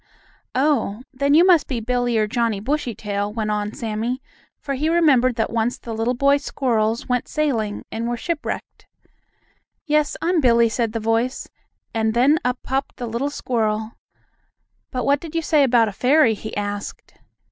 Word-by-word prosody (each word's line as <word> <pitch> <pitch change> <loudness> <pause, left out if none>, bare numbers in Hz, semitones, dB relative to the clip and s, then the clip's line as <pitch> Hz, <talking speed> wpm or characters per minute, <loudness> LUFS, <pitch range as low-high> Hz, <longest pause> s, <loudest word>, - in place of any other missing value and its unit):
"Oh, 260 -5 +1
then 280 +2 +2
you 340 +3 +7
must 350 -5 +5
be 255 -4 -2
Billie 245 0 0
or 215 - +3
Johnnie 230 -2 0
Bushytail," 210 -5 -2
went 215 -1 -2
on 210 0 -1
Sammie, 225 +3 -3 0.4
for 280 - -4
he 295 +4 0
remembered 275 -8 +4
that 225 -2 -1
once 230 +1 0
the 230 - -7
little 225 +3 0
boy 280 +3 +4
squirrels 235 -6 -1
went 250 -1 0
sailing 235 -9 -1
and 230 +1 -3
were 240 - -2
shipwrecked. 335 +5 -5 1.0
"Yes, 300 -1 +1
I'm 340 -1 +1
Billie," 235 -3 +4
said 230 -1 -1
the 225 - -1
voice, 225 +3 -1 0.5
and 220 -1 0
then 280 +6 +4
up 250 0 0
popped 270 +1 -2
the 245 - -4
little 235 +5 -2
squirrel. 220 -5 -1 1.0
"But 250 -2 -3
what 285 0 +3
did 330 0 -9
you 330 - 0
say 305 -1 +3
about 240 -4 +4
a - - -3
fairy?" 255 +3 +3
he 215 0 -7
asked. 205 0 -5
240 Hz, 170 wpm, -22 LUFS, 220-280 Hz, 1.0 s, you